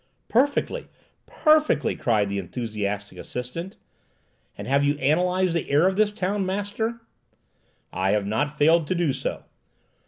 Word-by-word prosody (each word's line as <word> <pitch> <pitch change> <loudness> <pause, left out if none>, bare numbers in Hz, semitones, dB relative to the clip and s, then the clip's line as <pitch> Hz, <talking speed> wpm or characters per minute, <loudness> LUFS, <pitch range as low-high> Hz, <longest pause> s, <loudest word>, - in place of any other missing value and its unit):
"Perfectly! 285 - +1 0.4
perfectly!" 305 - +3
cried 110 -4 +1
the 100 0 -2
enthusiastic 105 0 -4
assistant; 145 +10 -6 0.8
"and - - -7
have 140 +2 +3
you 145 0 +1
analyzed 180 +5 +2
the 170 - -2
air 150 +6 +4
of 190 - +1
this 210 0 +3
town, 200 -1 -1
master?" 205 +4 -2 0.9
"I 95 +2 0
have 105 0 +1
not 145 +9 -1
failed 160 +1 +4
to 185 - 0
do 170 -6 +1
so. 135 - -4
155 Hz, 135 wpm, -24 LUFS, 120-195 Hz, 0.9 s, air